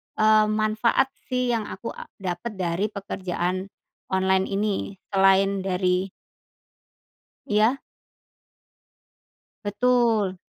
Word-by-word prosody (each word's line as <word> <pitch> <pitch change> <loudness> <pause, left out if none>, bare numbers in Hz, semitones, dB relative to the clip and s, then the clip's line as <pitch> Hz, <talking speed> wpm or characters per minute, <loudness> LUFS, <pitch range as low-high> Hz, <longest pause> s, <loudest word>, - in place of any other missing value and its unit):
eee, 215 0 +5
manfaat 215 +5 +1 0.2
sih 250 -1 0
yang 225 -3 -1
aku 190 +4 -6
a - - -10 0.2
dapet 180 +5 -4
dari 180 +1 -1
pekerjaan 185 -2 -3 0.4
online 190 0 +2
ini 200 0 -1 0.2
selain 195 0 +4
dari 185 0 0 1.4
Iya? 220 +5 +3 1.9
Betul. 220 -3 +2
200 Hz, 85 wpm, -25 LUFS, 190-215 Hz, 1.9 s, eee